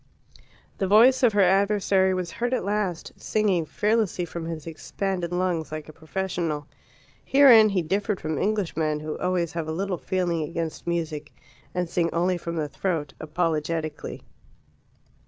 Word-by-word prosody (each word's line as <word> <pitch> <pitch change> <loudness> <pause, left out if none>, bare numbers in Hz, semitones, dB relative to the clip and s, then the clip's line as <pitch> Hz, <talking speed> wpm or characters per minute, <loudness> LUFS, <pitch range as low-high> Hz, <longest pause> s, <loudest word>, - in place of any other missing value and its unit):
The 195 - +1
voice 235 +6 +6
of 240 -4 +4
her 205 -1 +4
adversary 195 0 +3
was 180 -2 -3
heard 245 +2 -1
at - - -3
last, 200 -5 -2
singing 195 -7 0
fearlessly 210 -3 0
from 170 -1 -6
his 165 -2 -5
expanded 180 +2 -3
lungs, 175 -3 -1
like 155 -1 -6
a 155 - -11
professional. 160 -2 -3 0.6
Herein 250 -6 +7
he 190 -3 0
differed 200 +4 -1
from 155 -2 -3
Englishmen, 165 -7 0
who 155 0 -4
always 180 -3 0
have 165 0 -4
a - - -2
little 185 +1 -2
feeling 175 -3 -1
against 165 +1 -4
music, 160 -3 -3 0.4
and 180 -1 0
sing 170 0 0
only 180 +2 +1
from 170 0 -5
the 155 -2 -1
throat, 160 -2 -3
apologetically. 155 -1 -2
175 Hz, 150 wpm, -25 LUFS, 160-195 Hz, 0.6 s, Herein